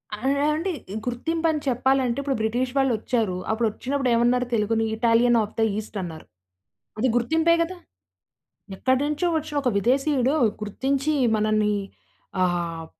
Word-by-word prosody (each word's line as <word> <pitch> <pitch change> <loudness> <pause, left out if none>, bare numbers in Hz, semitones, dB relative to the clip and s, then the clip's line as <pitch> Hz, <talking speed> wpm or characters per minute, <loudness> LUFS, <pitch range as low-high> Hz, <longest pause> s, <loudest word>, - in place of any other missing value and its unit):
అ - - -12
అ - - +2 0.3
అంటే 370 +5 -2 0.3
గుర్తింపని 320 +6 -1
చెప్పాలంటే, 260 0 +1
ఇప్పుడు 275 -1 -1
బ్రిటిషు 245 +4 -1
వాళ్ళొచ్చారూ, 230 -6 +1 0.2
అప్పుడొచ్చినప్పుడేమన్నారు 240 +2 +1
తెలుగుని, 225 0 +1
ఇటాలియన్ 235 +1 +4
ఆఫ్ 210 - -8
ద - - +4
ఈస్ట్ 215 0 -6
అన్నారు. 165 -3 -7 0.7
అది 260 - +2
గుర్తింపే 320 +7 +3
గదా! 365 +2 -6 1.0
ఎక్కడినుంచో 290 - +1
వచ్చిన 305 -1 -5
ఒక 250 - +2
విదేశీయుడు 265 +3 +2 0.3
గుర్తించి, 275 +8 -1 0.2
మనని 215 -1 +1 0.7
ఆహ్, 170 -2 -2
245 Hz, 115 wpm, -24 LUFS, 220-280 Hz, 1.0 s, ఇటాలియన్